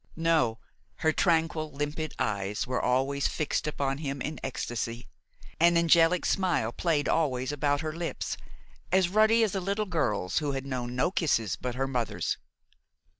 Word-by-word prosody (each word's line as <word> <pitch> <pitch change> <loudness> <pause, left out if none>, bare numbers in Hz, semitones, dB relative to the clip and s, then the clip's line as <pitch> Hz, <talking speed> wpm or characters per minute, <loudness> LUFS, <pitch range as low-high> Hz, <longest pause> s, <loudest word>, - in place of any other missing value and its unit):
No, 160 -8 +2 0.5
her 160 - +6
tranquil, 160 -3 +1
limpid 145 +2 -3
eyes 100 +5 -1
were 125 -1 -1
always 135 +2 +1
fixed 155 0 -1
upon 140 -2 -1
him 140 -2 -3
in 155 +3 -4
ecstasy; 120 -2 -4 0.5
an 170 +1 +5
angelic 170 +1 +4
smile 180 - +1
played 150 0 0
always 130 -5 +1
about 145 0 0
her 155 -1 -3
lips, 170 +1 -3 0.6
as 185 -1 +4
ruddy 220 +3 +4
as 215 - +1
a 195 - -1
little 200 +3 -1
girl's 120 - 0
who 145 -3 -2
has 135 -1 -3
known 125 -2 -4
no 150 +8 +1
kisses 115 - +1
but 125 -1 -4
her 135 +1 -1
mother's. 125 -4 -2
145 Hz, 155 wpm, -28 LUFS, 125-165 Hz, 0.6 s, her